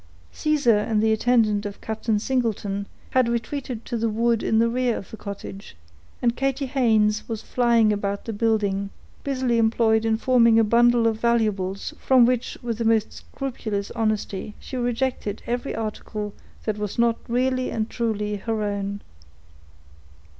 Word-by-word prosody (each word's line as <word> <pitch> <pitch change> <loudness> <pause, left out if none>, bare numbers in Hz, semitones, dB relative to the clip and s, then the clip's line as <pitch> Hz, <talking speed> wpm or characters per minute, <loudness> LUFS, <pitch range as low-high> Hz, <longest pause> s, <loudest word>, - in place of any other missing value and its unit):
Caesar 280 -8 +2
and 215 0 0
the 220 +1 +3
attendant 220 -2 +2
of 205 -1 -6
Captain 220 0 -1
Singleton, 205 -4 -1 0.2
had 255 -2 +3
retreated 235 0 -3
to - - -4
the 230 0 0
wood 230 +1 +1
in 220 - +1
the 230 +1 +4
rear 245 0 0
of 195 - -9
the - - -6
cottage, 200 - -8 0.5
and 235 -1 +2
Katy 270 +1 -1
Haynes 220 -6 +2
was 220 -2 -4
flying 235 -3 +3
about 200 0 -3
the 225 - -4
building, 205 -2 0 0.3
busily 255 -4 0
employed 220 0 +3
in 225 -1 +1
forming 235 -2 +4
a 225 - +6
bundle 235 +1 +4
of 220 -1 +1
valuables, 210 -5 0
from 255 -2 +5
which, 250 0 0
with 230 -2 -3
the - - 0
most 220 -1 +2
scrupulous 220 -7 -5
honesty, 215 -2 -2
she - - -8
rejected 245 -3 -2
every 245 +3 -2
article 215 -1 -4 0.3
that 210 -1 -2
was 210 -2 -4
not 235 -1 +2
really 255 +2 0
and 220 -1 -2
truly 210 -4 -2
her 220 +1 -2
own. 200 0 -3
225 Hz, 155 wpm, -24 LUFS, 210-240 Hz, 0.5 s, a